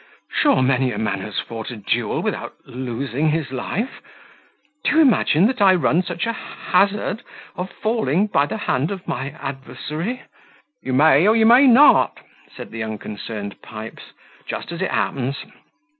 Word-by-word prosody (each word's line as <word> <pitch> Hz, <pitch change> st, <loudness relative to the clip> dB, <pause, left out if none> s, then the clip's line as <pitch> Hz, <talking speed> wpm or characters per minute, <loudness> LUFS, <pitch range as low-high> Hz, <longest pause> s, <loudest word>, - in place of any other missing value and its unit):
Sure 285 Hz, -, +3 dB
many 130 Hz, -1 st, +2 dB
a 105 Hz, -, -5 dB
man 105 Hz, -3 st, -2 dB
has 105 Hz, 0 st, -6 dB
fought 115 Hz, -1 st, -6 dB
a 125 Hz, -, -6 dB
duel 105 Hz, -3 st, -1 dB
without -, -, -3 dB
losing 130 Hz, +3 st, -2 dB
his 155 Hz, -3 st, -1 dB
life. 200 Hz, -, -4 dB, 0.8 s
Do -, -, +1 dB
you -, -, +5 dB
imagine 220 Hz, -, +4 dB
that 250 Hz, 0 st, 0 dB
I 190 Hz, -2 st, +6 dB
run 170 Hz, 0 st, +2 dB
such 175 Hz, -2 st, -3 dB
a 230 Hz, -, -1 dB
hazard 205 Hz, +1 st, 0 dB, 0.3 s
of 180 Hz, +1 st, -4 dB
falling 210 Hz, -, 0 dB
by 145 Hz, -9 st, +1 dB
the 220 Hz, -, -4 dB
hand 150 Hz, -7 st, -1 dB
of 195 Hz, -2 st, -6 dB
my 135 Hz, -, -3 dB
adversary?" 155 Hz, -, -5 dB, 0.6 s
"You 130 Hz, -, -4 dB
may 150 Hz, +5 st, +5 dB
or 220 Hz, -, +5 dB
you 225 Hz, -1 st, +4 dB
may 245 Hz, +5 st, +7 dB
not," 260 Hz, +4 st, +6 dB, 0.4 s
said -, -, -8 dB
the 115 Hz, -, -6 dB
unconcerned 105 Hz, -1 st, -6 dB
Pipes, 110 Hz, +1 st, -10 dB, 0.3 s
"just -, -, -5 dB
as 170 Hz, +1 st, -6 dB
it 190 Hz, -, 0 dB
happens. 135 Hz, +1 st, -1 dB
155 Hz, 160 wpm, -21 LUFS, 125-205 Hz, 0.8 s, may